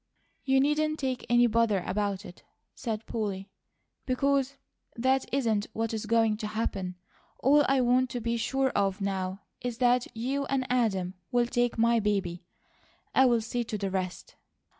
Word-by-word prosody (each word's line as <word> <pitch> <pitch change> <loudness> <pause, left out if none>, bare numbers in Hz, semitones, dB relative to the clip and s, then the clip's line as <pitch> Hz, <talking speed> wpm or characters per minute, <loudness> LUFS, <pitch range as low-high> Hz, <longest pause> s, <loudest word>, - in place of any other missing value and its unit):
"You 265 0 +3
needn't 305 +2 +1
take 260 -3 -3
any 240 0 +5
bother 225 -4 +2
about 205 0 -2
it," 175 - -12 0.3
said 225 -2 -4
Polly, 200 -3 -4 0.6
"because 275 +1 +1 0.4
that 260 +3 +1
isn't 225 -6 +1
what 225 0 -2
is 220 0 -3
going 225 -1 +3
to 215 - -4
happen. 200 -4 -3 0.4
All 290 +3 +5
I 270 -1 +3
want 250 +1 +3
to 245 - -3
be 235 0 -1
sure 265 +3 +1
of 200 -3 0
now 195 -1 -2 0.2
is 245 -2 -3
that 245 0 +3
you 270 +5 -1
and 270 -1 -1
Adam 195 -7 +1 0.2
will 245 -1 +3
take 245 -1 0
my 230 +1 +4
baby. 195 -5 -1 0.7
I'll 245 -3 +4
see 240 +2 -2
to 220 - -3
the 195 -1 -3
rest." 185 -1 -4
230 Hz, 160 wpm, -28 LUFS, 205-255 Hz, 0.7 s, any